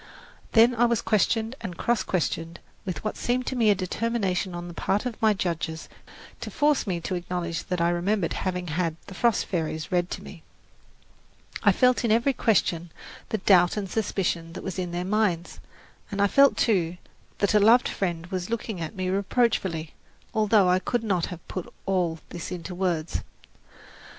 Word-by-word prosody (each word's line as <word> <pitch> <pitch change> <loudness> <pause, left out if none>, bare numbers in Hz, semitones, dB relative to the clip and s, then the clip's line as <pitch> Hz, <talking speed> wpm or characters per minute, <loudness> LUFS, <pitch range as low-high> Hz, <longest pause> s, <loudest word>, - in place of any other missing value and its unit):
Then 230 +2 +6
I 240 0 +3
was 235 -2 +2
questioned 225 +2 +1
and 180 -6 -6
cross 240 -1 +1
questioned 165 -1 -2 0.3
with 185 -3 -4
what 215 - -3
seemed 250 +1 0
to 260 - -2
me 230 -3 +3
a 205 - +5
determination 190 -1 -1
on 175 0 -5
the 175 - -8
part 200 +6 0
of 245 -3 -5
my 215 -1 +4
judges 165 -3 -3 0.5
to - - -5
force 295 -5 +2
me 180 -3 -1
to 185 - -3
acknowledge 175 -1 -3
that 180 -1 -2
I 170 0 +3
remembered 180 +1 0
having 180 -1 -2
had 165 0 -1
"The 195 - -10
Frost 235 +3 +2
Fairies" 160 -3 -3
read 175 0 +1
to - - -5
me. - - -11 1.2
I - - +6
felt 250 -1 +3
in 230 - +2
every 235 +5 +3
question 175 -8 +1 0.4
the 220 - 0
doubt 185 -2 +4
and 200 -2 -2
suspicion 185 -5 -1
that - - -7
was 190 -1 -4
in 180 -1 -2
their 175 +1 -3
minds, 190 -4 0 0.5
and 200 - -4
I 200 - +5
felt, 275 +7 +5
too, 180 -6 +1 0.4
that 200 - +1
a 210 - +6
loved 230 +4 +6
friend 170 -3 -2
was 185 0 -3
looking 220 -5 -3
at 160 - -5
me 185 -1 -2
reproachfully, 190 -5 0 0.4
although 215 -2 +4
I 180 +1 +4
could 230 +5 -1
not 185 -6 0
have 175 -2 -9
put 185 - -6
all 180 -4 0
this 170 0 -6
into 180 0 -5
words. 175 -3 -1
185 Hz, 180 wpm, -26 LUFS, 175-220 Hz, 1.2 s, Then